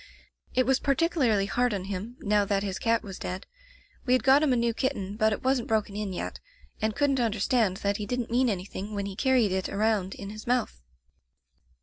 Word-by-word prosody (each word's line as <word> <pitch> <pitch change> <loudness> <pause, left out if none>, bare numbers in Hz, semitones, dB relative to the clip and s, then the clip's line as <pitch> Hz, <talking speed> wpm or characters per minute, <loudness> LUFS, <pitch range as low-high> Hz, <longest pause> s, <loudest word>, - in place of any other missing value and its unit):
"It 255 - +3
was 265 +1 +3
particularly 275 - +2
hard 245 +2 +1
on 190 - -3
him 200 +5 -5
now 205 0 +2
that 200 -1 0
his 195 -2 -3
cat 230 0 +1
was 195 -3 -8
dead. 185 +1 -5 0.6
We 250 - +2
had 255 -3 +3
got 270 +4 +6
him 305 -3 +3
a - - +4
new 235 -1 +1
kitten, 205 -6 -2
but 220 0 +2
it 210 - -3
wasn't 260 -2 +1
broken 215 -2 0
in 210 -2 -3
yet, 180 - -5 0.4
and 215 0 0
couldn't 280 -2 +2
understand 220 -2 +1
that 200 0 +1
he 210 - -5
didn't 245 -2 -2
mean 250 +1 +3
anything 200 +1 -4
when 200 -1 -2
he 200 -1 -5
carried 250 -3 +3
it 190 0 -1
around 205 -2 0
in 200 0 -7
his 215 +1 -10
mouth. 240 - 0
215 Hz, 210 wpm, -27 LUFS, 200-250 Hz, 0.6 s, got